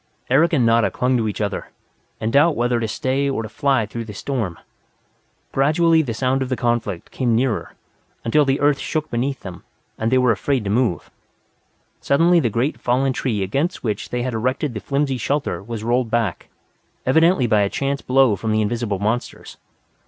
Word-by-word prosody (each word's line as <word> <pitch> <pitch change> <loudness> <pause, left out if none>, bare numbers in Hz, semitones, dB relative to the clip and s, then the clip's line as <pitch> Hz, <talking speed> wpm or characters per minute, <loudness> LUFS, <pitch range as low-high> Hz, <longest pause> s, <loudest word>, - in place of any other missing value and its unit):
Eric 165 +6 +4
and 130 -6 +3
Nada 115 0 +3
clung 125 +1 0
to 110 -2 0
each 105 - -4
other, 100 -2 -3 0.5
in 110 - -1
doubt 145 +4 +4
whether 120 0 +1
to 115 - -1
stay 135 +5 -1
or 135 -4 -2
to 110 - -7
fly 135 -6 +1
through 115 +2 -6
the 105 -2 -9
storm. 110 -10 -3 0.9
Gradually 160 +4 +3
the 120 -7 -4
sound 130 +2 0
of 130 - -2
the 130 - 0
conflict 120 -7 -2
came 120 -3 0
nearer, 120 -1 -1 0.5
until 150 +6 +4
the 135 -1 +1
earth 145 -1 +3
shook 155 -1 -3
beneath 130 +3 -2
them, 90 -3 -9 0.4
and 115 +1 0
they 130 - +4
were 125 -2 +4
afraid 125 +4 0
to 100 - -2
move. 115 -5 0 0.9
Suddenly 170 +5 +3
the 120 - +1
great 120 +8 -1
fallen 130 +2 +1
tree 110 -7 -1
against 140 - -2
which 110 -4 -3
they 120 0 -2
had 130 -1 -2
erected 130 +4 -1
the 110 - -4
flimsy 140 +1 -1
shelter 140 +1 -1
was 110 +1 -6
rolled 120 +1 +1
back, 110 -6 -1 0.6
evidently 160 +1 +4
by 110 -3 +3
a 100 - +1
chance 140 +3 -2
blow 130 -4 +3
from 110 +2 -3
the 110 0 +2
invisible 105 -1 -2
monsters. 110 +5 -3
125 Hz, 190 wpm, -21 LUFS, 110-140 Hz, 0.9 s, Eric